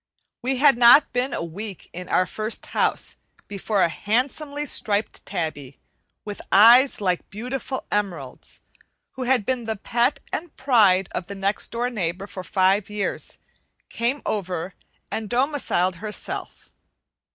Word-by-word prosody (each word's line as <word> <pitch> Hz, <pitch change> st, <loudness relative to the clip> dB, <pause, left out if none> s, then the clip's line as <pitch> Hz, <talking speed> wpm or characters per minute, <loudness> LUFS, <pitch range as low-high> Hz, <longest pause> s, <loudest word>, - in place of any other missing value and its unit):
We 260 Hz, +2 st, -1 dB
had 275 Hz, -2 st, +5 dB
not 245 Hz, +4 st, +7 dB
been 250 Hz, +2 st, 0 dB
a -, -, -3 dB
week 190 Hz, +4 st, -7 dB
in 180 Hz, +1 st, -7 dB
our 185 Hz, -, +3 dB
first 215 Hz, +3 st, -3 dB
house -, -, -1 dB, 0.3 s
before 200 Hz, 0 st, 0 dB
a -, -, +4 dB
handsomely 280 Hz, -, -1 dB
striped 210 Hz, -6 st, -1 dB
tabby, 155 Hz, -7 st, -4 dB, 0.5 s
with 205 Hz, -1 st, -6 dB
eyes 240 Hz, +7 st, +7 dB
like 180 Hz, -3 st, -1 dB
beautiful 250 Hz, +5 st, -5 dB
emeralds, 175 Hz, -11 st, -4 dB, 0.5 s
who 255 Hz, -, -5 dB
had 245 Hz, -4 st, +2 dB
been 250 Hz, -1 st, -1 dB
the 220 Hz, 0 st, -2 dB
pet 240 Hz, +6 st, 0 dB
and 335 Hz, 0 st, -5 dB
pride 195 Hz, -8 st, +4 dB
of 180 Hz, -, -4 dB
the 200 Hz, -, -7 dB
next 195 Hz, +1 st, 0 dB
door 240 Hz, +2 st, -2 dB
neighbor 190 Hz, -3 st, -3 dB
for 190 Hz, -2 st, -8 dB
five 190 Hz, +2 st, +2 dB
years, 210 Hz, -1 st, -3 dB, 0.5 s
came 240 Hz, +5 st, -1 dB
over 185 Hz, -3 st, -3 dB, 0.4 s
and 220 Hz, -2 st, -4 dB
domiciled 245 Hz, -, +1 dB
herself. 210 Hz, +3 st, -6 dB
210 Hz, 140 wpm, -23 LUFS, 190-250 Hz, 0.5 s, not